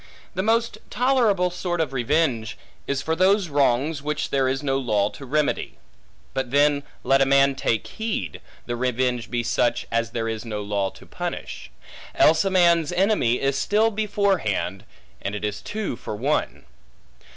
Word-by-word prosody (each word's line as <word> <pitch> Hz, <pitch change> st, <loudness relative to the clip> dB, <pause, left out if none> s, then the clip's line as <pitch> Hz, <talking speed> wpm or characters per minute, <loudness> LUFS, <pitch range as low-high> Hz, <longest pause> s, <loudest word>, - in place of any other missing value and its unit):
The 185 Hz, -, -1 dB
most 230 Hz, +3 st, +1 dB
tolerable 225 Hz, -7 st, +2 dB
sort 175 Hz, -1 st, -3 dB
of 155 Hz, -5 st, -1 dB
revenge, 125 Hz, -4 st, 0 dB, 0.3 s
is 135 Hz, -1 st, -1 dB
for 160 Hz, -, 0 dB
those 190 Hz, +1 st, +3 dB
wrongs 140 Hz, +1 st, +1 dB
which 150 Hz, +1 st, -3 dB
there 135 Hz, -1 st, +2 dB
is 135 Hz, +2 st, -1 dB
no 135 Hz, -1 st, +1 dB
law 105 Hz, -5 st, +1 dB
to 135 Hz, -, -10 dB
remedy; 150 Hz, +2 st, -1 dB, 0.6 s
but 130 Hz, -2 st, -2 dB
then 145 Hz, +1 st, +3 dB, 0.2 s
let 135 Hz, 0 st, +3 dB
a -, -, +5 dB
man 140 Hz, 0 st, +4 dB
take 115 Hz, -4 st, -1 dB
heed, 215 Hz, -, -4 dB, 0.2 s
the 120 Hz, -, -3 dB
revenge 125 Hz, -1 st, -1 dB
be 120 Hz, -1 st, -1 dB
such 120 Hz, +1 st, +1 dB
as 115 Hz, -1 st, 0 dB
there 115 Hz, +2 st, -3 dB
is 110 Hz, -1 st, -3 dB
no 105 Hz, -3 st, -4 dB
law 100 Hz, -1 st, -1 dB
to -, -, -16 dB
punish; -, -, -6 dB, 0.5 s
else 160 Hz, +3 st, +5 dB
a 195 Hz, -, +1 dB
man's 170 Hz, -4 st, +4 dB
enemy 175 Hz, -, +2 dB
is 135 Hz, 0 st, 0 dB
still 220 Hz, +2 st, +2 dB
before 205 Hz, -2 st, +1 dB
hand, 95 Hz, -, -2 dB, 0.4 s
and 100 Hz, -, -3 dB
it 105 Hz, -, -3 dB
is 105 Hz, -1 st, -3 dB
two 210 Hz, -, -4 dB
for 110 Hz, -, -6 dB
one. 135 Hz, +8 st, -1 dB
140 Hz, 170 wpm, -24 LUFS, 120-180 Hz, 0.6 s, a